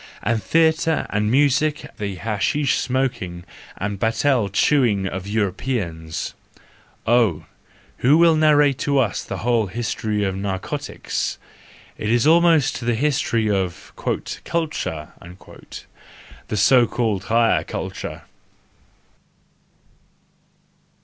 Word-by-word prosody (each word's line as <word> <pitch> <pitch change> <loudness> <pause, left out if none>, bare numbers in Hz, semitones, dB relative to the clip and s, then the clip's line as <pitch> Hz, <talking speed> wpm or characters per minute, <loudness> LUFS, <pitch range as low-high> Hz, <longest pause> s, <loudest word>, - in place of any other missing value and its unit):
And 115 -1 0
theatre 160 - +2
and 105 +1 0
music 145 +3 +2
the 100 -3 -4
hashish 115 +8 0
smoking 120 -10 -2 0.3
and 100 0 -3
betel 115 0 +1
chewing 105 -2 +2
of 95 0 -4
Europeans! 100 -6 -3 0.7
Oh, 115 -9 +2 0.5
who 140 +5 +4
will 165 -1 +5
narrate 150 -3 +4
to 140 -1 0
us 120 -8 +1
the - - -5
whole 115 -3 +2
history 105 0 -2
of 95 -1 -1
narcotics!—It 95 +2 -5
is 120 +2 +2
almost 160 -3 +4
the 120 -1 0
history 125 -4 0
of 95 -3 -3 0.5
" - - -31
culture," 150 - -2 1.4
the 105 - -3
so 120 +4 +5
called 110 -5 -1
higher 115 0 +2
culture! - - -6
115 Hz, 100 wpm, -21 LUFS, 100-140 Hz, 1.4 s, will